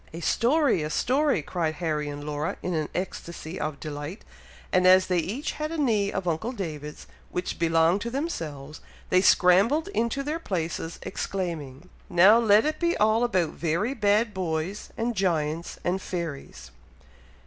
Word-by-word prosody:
"A 165 - -6
story! 250 - +2
a 150 - -3
story!" 265 - +1
cried 160 -1 -2
Harry 150 -3 -2
and 145 0 -6
Laura, 150 +1 -3
in 180 - -2
an 155 -2 -1
ecstacy 175 -2 -5
of 155 -2 -3
delight, 150 +6 -6 0.5
and 185 0 +4
as 185 0 +7
they 180 -1 +1
each 230 - -3
had 305 +1 -4
a 330 - -3
knee 220 -9 +1
of 190 -2 -3
uncle 170 +10 -1
David's, 155 - -6 0.2
which 180 +1 -4
belonged 165 +3 +3
to 235 - -3
themselves, 155 - -5 0.3
they 185 - +5
scrambled 200 - +4
into 275 - -1
their 305 +3 -2
places, 170 - -3
exclaiming, 165 -5 -4 0.2
"Now 190 +6 +7
let 215 0 +5
it 310 - -1
be 340 0 +1
all 220 +2 +3
about 185 -9 +1
very 170 - -1
bad 210 -1 +2
boys, 180 +2 -3
and 235 +1 -1
giants, 165 -4 -1
and 185 +2 0
fairies!" 140 - -6
180 Hz, 160 wpm, -26 LUFS, 160-225 Hz, 0.5 s, as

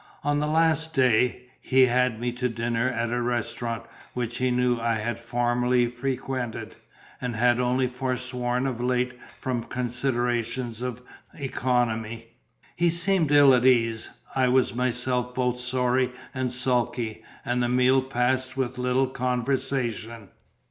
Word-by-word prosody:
On 145 0 +1
the 150 - 0
last 160 +1 +2
day, 125 -1 +3 0.2
he 130 0 +4
had 125 -2 +1
me 120 +1 -1
to 125 +1 -2
dinner 115 +1 -1
at 115 -2 -2
a 120 0 0
restaurant 120 -1 -2 0.3
which 120 -1 -2
he 130 0 +1
knew 125 -1 +1
I 115 0 +1
had 115 +2 -3
formerly 120 +1 +1
frequented, 130 -1 -4 0.5
and 125 -2 -3
had 120 +2 +3
only 125 +1 +2
forsworn 125 0 -2
of 125 -3 -2
late 125 0 0 0.3
from 125 -2 -2
considerations 120 -1 -2
of 125 -1 -4 0.3
economy. 115 -4 -1 0.5
He 175 0 +3
seemed 170 -2 +2
ill 145 -2 +7
at 125 -1 +3
ease; 115 -3 +3 0.3
I 130 -1 +3
was 125 0 +3
myself 125 0 -1
both 125 -1 0
sorry 125 0 +1 0.2
and 130 -1 -2
sulky; 120 -3 0 0.2
and 125 -1 0
the 120 - +1
meal 125 +1 +4
passed 130 +1 -1
with 130 -1 -2
little 125 +1 +2
conversation. 125 -4 -2
125 Hz, 140 wpm, -26 LUFS, 120-130 Hz, 0.5 s, ill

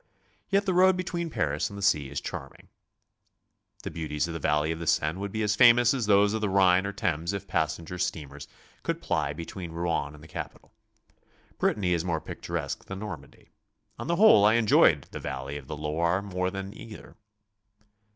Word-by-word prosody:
Yet 200 +1 +2
the 190 - +1
road 185 +1 +5
between 175 -2 -3
Paris 75 - -1
and 100 - -9
the 100 - -6
sea 75 -9 +2
is 70 - -3
charming. - - -8 1.1
The - - -5
beau 80 -2 -5
ties 75 +2 -1
of 85 - -5
the 80 - -4
valley 75 +1 +1
of 80 - -4
the 85 - -6
Seine 75 +5 +1
would 100 0 -4
be 110 +1 -2
as 105 0 +1
famtous 120 +1 +6
as 125 -6 -2
those 100 0 +4
of 110 - -2
the 105 - 0
Rhine 95 0 +4
or - - -3
Thames 85 -2 -2
if 100 - -5
passenger 85 +2 -2
steamers 75 -4 -4 0.3
could - - -2
ply 70 - -1
between 85 +2 -7
Rouen 85 -3 -2
and 75 - -15
the - - -12
capitol. - - -8 0.9
Brittany 90 -4 +1
is 85 -1 0
more 85 -3 -1
picturesque - - -5
than 95 - -7
Normandy. 95 -9 -9 0.5
On - - -5
the 170 - +1
whole 190 - +7
I 105 +2 +5
enjoyed 115 -3 +4
the - - -6
valley 65 +1 -5
of 70 -2 -8
the 75 - -6
Loire 85 +5 0
more 90 -2 -2
than 95 +1 -6
either. 110 -2 -11
90 Hz, 195 wpm, -27 LUFS, 80-105 Hz, 1.1 s, whole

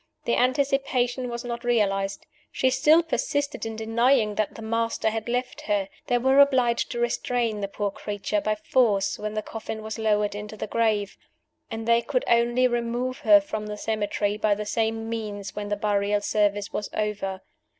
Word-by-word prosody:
The 235 - +1
anticipation 255 -1 +1
was 235 +1 -5
not 235 0 -4
realized; 200 -5 0 0.3
she 260 - +1
still 305 +5 +5
persisted 285 -5 -2
in 225 - -5
denying 225 0 +2
that 210 0 -1
"the 225 - -8
Master" 230 0 0
had 225 +1 -4
left 250 +1 -2
her. 200 -2 0 0.2
They 245 - +3
were 265 +3 +3
obliged 255 -4 +4
to 240 - -4
restrain 240 -2 0
the 200 - -1
poor 200 0 -3
creature 205 +1 -3
by 215 +1 0
force 210 -3 +1
when 215 0 -4
the 215 - -2
coffin 220 0 -6
was 220 +1 -5
lowered 210 -2 +1
into 210 +1 -7
the 215 - -3
grave; 215 -2 0 0.5
and 225 0 -5
they 235 0 +4
could 255 0 -1
only 240 +2 +3
remove 240 +2 -2
her 310 -1 +7
from 255 -9 -5
the 210 0 -5
cemetery 210 -1 -1
by 215 -1 +2
the 210 +1 -5
same 225 +1 -1
means 210 -3 -5
when 205 -1 -4
the 205 - +1
burial 205 0 +1
service 205 -1 0
was 210 - -3
over. 205 -3 -2
225 Hz, 180 wpm, -25 LUFS, 210-245 Hz, 0.5 s, her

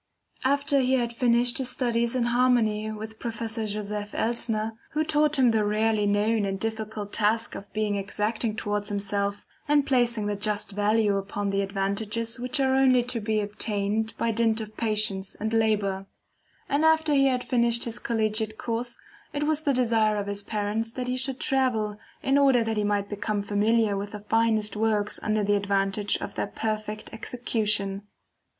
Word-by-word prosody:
After 280 +1 +2
he 260 0 +2
had 235 -2 -1
finished 240 +1 +2
his 260 -2 -2
studies 235 -1 0
in 250 - +1
harmony 235 -3 +2
with 220 +1 -8
Professor 225 -1 -3
Joseph 210 0 -4
Elsner, 225 -1 -1 0.2
who 305 +1 +1
taught 305 -1 +2
him 255 -3 +5
the 220 -1 +2
rarely 210 0 +1
known 210 +2 +2
and 195 -1 -2
difficult 220 -1 -4
task 225 +2 +1
of 200 - -9
being 215 -1 -1
exacting 210 +3 -1
towards 205 -1 -2
himself, 200 0 -1 0.2
and 290 -1 +3
placing 240 -4 +1
the 205 0 -1
just 210 0 -1
value 205 0 +2
upon 200 0 -3
the 195 0 +1
advantages 205 +4 -2
which 250 +3 -2
are 265 -1 +2
only 260 -2 +4
to 245 -1 -1
be 215 0 0
obtained 210 +1 -2
by 230 - 0
dint 225 0 +2
of 215 -1 -7
patience 210 -3 0
and 220 +1 -3
labor; 205 -4 +1 0.6
and 285 +2 +1
after 320 -1 +4
he 275 -1 +4
had 250 -2 0
finished 235 -2 +2
his 235 -1 -3
collegiate 220 -1 0
course, 240 +1 -3 0.4
it 290 - -1
was 310 0 +1
the 290 - +1
desire 225 -4 +2
of 205 - -2
his 200 0 -3
parents 215 +2 -2
that 250 +1 -4
he 250 - -1
should 260 0 0
travel 235 -7 0 0.2
in 275 +1 +3
order 265 -4 +4
that 225 -1 -2
he 210 - +1
might 205 -1 0
become 205 0 -2
familiar 210 +1 +2
with 200 +2 -5
the 210 - -5
finest 220 -1 +1
works 210 -1 +1
under 215 0 0
the 205 +1 +2
advantage 200 0 +1
of - - -6
their - - -2
perfect 215 0 -4
execution. 215 -4 -1
220 Hz, 175 wpm, -26 LUFS, 205-240 Hz, 0.6 s, him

